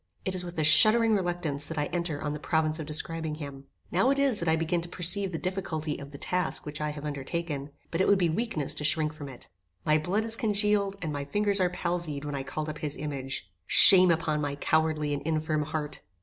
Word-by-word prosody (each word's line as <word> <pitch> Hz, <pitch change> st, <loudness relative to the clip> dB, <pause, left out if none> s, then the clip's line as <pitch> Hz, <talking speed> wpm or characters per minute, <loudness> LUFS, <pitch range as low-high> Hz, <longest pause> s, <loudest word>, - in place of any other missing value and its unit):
It 190 Hz, -, -1 dB
is 185 Hz, -1 st, -3 dB
with 175 Hz, -1 st, -8 dB
a 155 Hz, -, +1 dB
shuddering 215 Hz, +9 st, +6 dB
reluctance 175 Hz, -7 st, -1 dB
that 160 Hz, -, -6 dB
I 150 Hz, -, 0 dB
enter 170 Hz, -4 st, -2 dB
on 150 Hz, 0 st, -3 dB
the 150 Hz, -, -5 dB
province 155 Hz, +1 st, 0 dB
of 155 Hz, -, -6 dB
describing 160 Hz, 0 st, -3 dB
him. 140 Hz, -3 st, -9 dB, 0.3 s
Now 190 Hz, +9 st, +2 dB
it 275 Hz, -, +2 dB
is 275 Hz, -6 st, +2 dB
that 170 Hz, -, -1 dB
I 160 Hz, -, +3 dB
begin 165 Hz, +2 st, -1 dB
to 170 Hz, -, -7 dB
perceive 185 Hz, +2 st, +2 dB
the 165 Hz, -, -3 dB
difficulty 160 Hz, -5 st, -3 dB
of 140 Hz, -, -9 dB
the 140 Hz, -, -10 dB
task 180 Hz, +3 st, -1 dB
which 150 Hz, 0 st, -7 dB
I 150 Hz, -, -1 dB
have 150 Hz, 0 st, -7 dB
undertaken; 145 Hz, 0 st, -4 dB, 0.2 s
but 165 Hz, -, 0 dB
it -, -, +2 dB
would 200 Hz, -, +5 dB
be 180 Hz, -2 st, +2 dB
weakness 160 Hz, -, -2 dB
to -, -, -6 dB
shrink 155 Hz, 0 st, +1 dB
from 145 Hz, -3 st, -9 dB
it. 125 Hz, -, -13 dB, 0.4 s
My 155 Hz, 0 st, +3 dB
blood 195 Hz, +8 st, -1 dB
is 225 Hz, 0 st, +3 dB
congealed: 210 Hz, -2 st, +1 dB
and 155 Hz, -2 st, -3 dB
my 140 Hz, -1 st, -4 dB
fingers 205 Hz, +5 st, 0 dB
are 180 Hz, -, +2 dB
palsied 170 Hz, -5 st, -3 dB
when 145 Hz, -, -4 dB
I 140 Hz, -, -3 dB
call 155 Hz, +3 st, -5 dB
up 155 Hz, 0 st, -6 dB
his 150 Hz, -2 st, -4 dB
image. 135 Hz, -, -5 dB, 0.2 s
Shame 185 Hz, -2 st, +9 dB
upon 160 Hz, -2 st, 0 dB
my 145 Hz, -1 st, -2 dB
cowardly 155 Hz, 0 st, 0 dB
and 145 Hz, -, -3 dB
infirm 155 Hz, -1 st, -1 dB
heart! 150 Hz, 0 st, -4 dB
160 Hz, 235 wpm, -28 LUFS, 150-180 Hz, 0.4 s, Shame